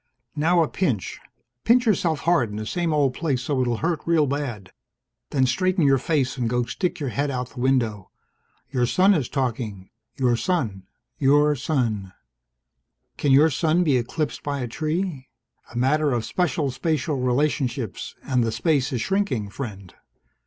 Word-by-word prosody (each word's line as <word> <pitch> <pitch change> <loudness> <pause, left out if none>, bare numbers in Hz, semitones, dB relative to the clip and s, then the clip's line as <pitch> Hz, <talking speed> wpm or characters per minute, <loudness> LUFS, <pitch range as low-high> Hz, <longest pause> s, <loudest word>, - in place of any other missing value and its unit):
Now 165 +3 +3
a - - -1
pinch. 135 - -2 0.4
Pinch 245 +2 +4
yourself 175 -8 +1
hard 165 -9 +2
in 105 - -7
the 110 0 -4
same 170 +7 -1
old 145 -4 +2
place 135 -4 -1
so 135 -1 0
it'll 120 -2 0
hurt 170 -2 0
real 165 -3 +4
bad. 130 -8 -4 0.6
Then 135 -3 +2
straighten 180 +6 +1
your 135 -1 +4
face 135 -3 0
and 120 -3 -1
go 125 +1 +1
stick 180 - -2
your 140 -4 -2
head 140 +4 -1
out 125 -2 -3
the 125 - -10
window. 115 -7 0 0.6
Your 125 -3 +1
son 190 +9 +4
is 145 -9 -1
talking 115 -8 -3 0.2
your 125 -3 +2
son, 115 - -2 0.3
your 145 +2 +4
sun. 115 - -1 1.0
Can 145 - +1
your 150 +4 +6
son 165 +4 +2
be 150 -6 +3
eclipsed 135 +5 -2
by 140 -1 -3
a 125 - -2
tree? 155 +1 -3 0.4
A - - -7
matter 145 +3 +2
of 120 -2 -1
special 160 -6 0
spatial 150 +1 -1
relationships, 125 -3 -1
and 125 -3 +1
the 115 - 0
space 145 +1 +1
is 125 -3 -1
shrinking, 190 - -1
friend. 100 -8 -7
135 Hz, 165 wpm, -24 LUFS, 120-160 Hz, 1.0 s, your